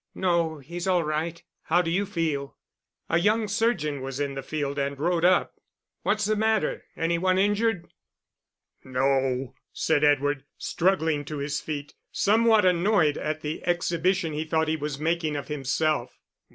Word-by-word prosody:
"No; 170 -3 +1
he's 170 +6 -6
all 180 -2 +3
right. 160 +2 -3 0.2
How 175 +2 +3
d'you 180 +4 0
feel?" 155 -7 -2 0.5
A 165 - +2
young 215 +4 +2
surgeon 195 - 0
was 135 +1 -5
in 140 -1 -1
the 135 - -4
field, 140 0 -3
and 140 0 -2
rode 170 +2 +1
up. 185 +1 +3 0.5
"What's 215 0 +1
the 215 +1 +1
matter? 220 +1 0
Any 170 +1 0
one 185 +1 +2
injured?" 205 -1 +1 1.0
"No," 130 -1 0 0.2
said 145 - +1
Edward, 145 -1 +2
struggling 165 -5 +1
to 150 +1 -5
his 145 +1 -2
feet, 145 -2 -5 0.2
somewhat 220 0 +4
annoyed 175 -3 +3
at 155 0 -3
the 150 +1 -4
exhibition 175 0 +1
he 150 +1 -2
thought 160 0 0
he 160 - +1
was 150 -2 -4
making 160 0 -1
of 145 - -5
himself. 145 -2 -1
160 Hz, 150 wpm, -26 LUFS, 145-185 Hz, 1.0 s, somewhat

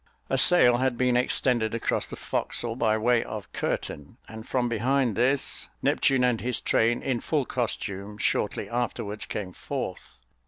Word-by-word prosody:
A - - +2
sail 125 -9 +5
had 130 -1 0
been 125 0 +2
extended 125 -2 +1
across 115 - -1
the - - -7
forecastle 115 -1 -2
by 110 -3 +2
way 120 +1 +2
of 105 -4 -8
curtain, 75 +10 -4
and 110 +1 -10
from 125 -2 0
behind 120 0 +1
this, 130 +5 +2
Neptune 135 -2 +3
and 125 -2 +2
his 125 -1 0
train, 115 +1 +1
in 130 -3 0
full 145 0 0
costume, 105 -5 -3
shortly 105 -1 -1
afterwards 110 -2 -3
came 95 -4 -5
forth. 65 - -6
120 Hz, 155 wpm, -26 LUFS, 110-125 Hz, -, sail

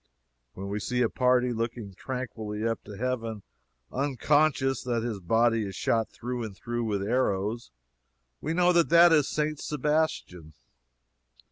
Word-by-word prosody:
When 95 +1 -6
we 100 +1 -3
see 125 +4 0
a 115 - +2
party 125 -1 +2
looking 115 -3 -4
tranquilly 110 -3 -4
up 115 -1 -2
to 105 -1 -9
heaven, 115 -3 -3 0.5
unconscious 140 0 +1
that 120 -3 -1
his 115 -4 -3
body 115 +5 +2
is 95 -2 -6
shot 115 -1 0
through 125 0 -5
and 105 -4 -7
through 120 0 -3
with 100 -3 -1
arrows, 110 -1 -1 0.7
we 160 +3 -2
know 180 0 +4
that 170 -1 +3
that 170 +1 +7
is 150 -3 +4
St. 150 -1 -1
Sebastian. 150 - -2
120 Hz, 145 wpm, -28 LUFS, 105-135 Hz, 0.7 s, that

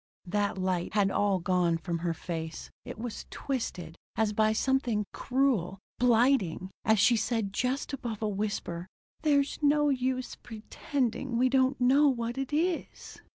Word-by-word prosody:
That 205 +2 -1
light 185 0 -1
had 200 -2 +3
all 205 -2 +2
gone 180 -1 +1
from 170 0 -3
her 170 0 -1
face. 160 -1 -6
It - - -7
was 230 0 -6
twisted, 180 - -4 0.2
as 215 -1 +1
by 215 +1 +3
something 235 -3 +1
cruel, 250 -9 0 0.2
blighting, 235 -7 +2
as 220 0 +4
she 230 +4 +5
said 220 -2 -1
just 255 +6 -1
above 235 -5 -4
a - - +1
whisper: 195 -4 -3 0.3
"There's 285 -2 +2
no 295 0 +4
use 255 -1 -1
pretending 240 +2 -3
we 255 +2 +3
don't 260 0 +2
know 270 +4 +5
what 240 0 -2
it 270 0 -3
is." 330 +3 -2
225 Hz, 150 wpm, -29 LUFS, 195-260 Hz, 0.3 s, she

